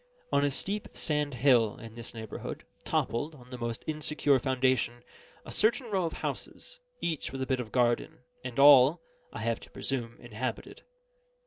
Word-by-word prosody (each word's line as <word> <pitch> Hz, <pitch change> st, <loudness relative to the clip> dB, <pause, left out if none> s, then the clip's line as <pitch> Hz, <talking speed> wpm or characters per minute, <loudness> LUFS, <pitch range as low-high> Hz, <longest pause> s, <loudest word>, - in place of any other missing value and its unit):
On 140 Hz, -, +3 dB
a 145 Hz, -, +3 dB
steep 200 Hz, +9 st, -2 dB
sand 150 Hz, -3 st, -1 dB
hill, 120 Hz, -4 st, +4 dB
in 115 Hz, -1 st, -10 dB
this 115 Hz, 0 st, -8 dB
neighbourhood, 110 Hz, -1 st, -6 dB, 0.2 s
toppled, 145 Hz, +7 st, -1 dB
on 125 Hz, -2 st, -16 dB
the 125 Hz, -, -5 dB
most 120 Hz, -1 st, -4 dB
insecure 150 Hz, -3 st, +2 dB
foundation, 130 Hz, -1 st, +1 dB, 0.4 s
a -, -, -8 dB
certain 230 Hz, +2 st, +2 dB
row 190 Hz, -3 st, +1 dB
of 165 Hz, -, -3 dB
houses, -, -, -5 dB, 0.2 s
each 160 Hz, -4 st, -2 dB
with 135 Hz, -, -5 dB
a -, -, -2 dB
bit 130 Hz, -1 st, 0 dB
of 115 Hz, -3 st, -5 dB
garden, 120 Hz, -1 st, +1 dB, 0.2 s
and 125 Hz, -2 st, -6 dB
all 140 Hz, +2 st, +8 dB, 0.3 s
(I -, -, -6 dB
have 115 Hz, 0 st, 0 dB
to -, -, -14 dB
presume) 120 Hz, -4 st, -3 dB
inhabited. 120 Hz, +2 st, -5 dB
130 Hz, 170 wpm, -30 LUFS, 120-150 Hz, 0.4 s, all